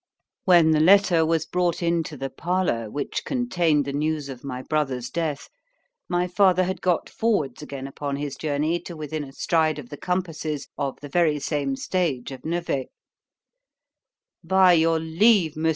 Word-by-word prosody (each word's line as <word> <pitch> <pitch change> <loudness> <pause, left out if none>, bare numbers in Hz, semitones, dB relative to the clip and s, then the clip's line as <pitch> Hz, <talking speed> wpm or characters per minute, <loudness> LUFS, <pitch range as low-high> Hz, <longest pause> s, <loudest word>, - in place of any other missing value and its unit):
When 170 -4 +6
the 155 - +3
letter 180 0 +5
was 160 -1 +1
brought 175 -1 -1
into 165 -3 -1
the 135 0 -4
parlour, 170 -11 -1
which 145 +6 -3
contained 175 - +1
the 140 - -4
news 150 0 -1
of 125 -2 -9
my 130 -2 -5
brother's 135 -6 -2
death, 160 -4 -3 0.6
my 175 0 +1
father 185 0 +3
had 185 +1 -3
got 180 -3 +1
forwards 195 - -1
again 140 -2 -7
upon 140 +1 -4
his 140 -1 -4
journey 155 +3 -1
to 170 -1 -9
within 155 0 -4
a 135 - -10
stride 160 +1 +1
of 135 -5 -9
the 145 - -8
compasses 160 -5 -3
of 140 -2 -3
the 145 - -7
very 155 0 +2
same 140 -1 -2
stage 145 -6 -2
of 130 -2 -9
Nevers.——By 175 - -3
your 165 0 +3
leave, 165 +1 +3
Mons. 160 +1 0
160 Hz, 160 wpm, -24 LUFS, 145-175 Hz, 0.6 s, When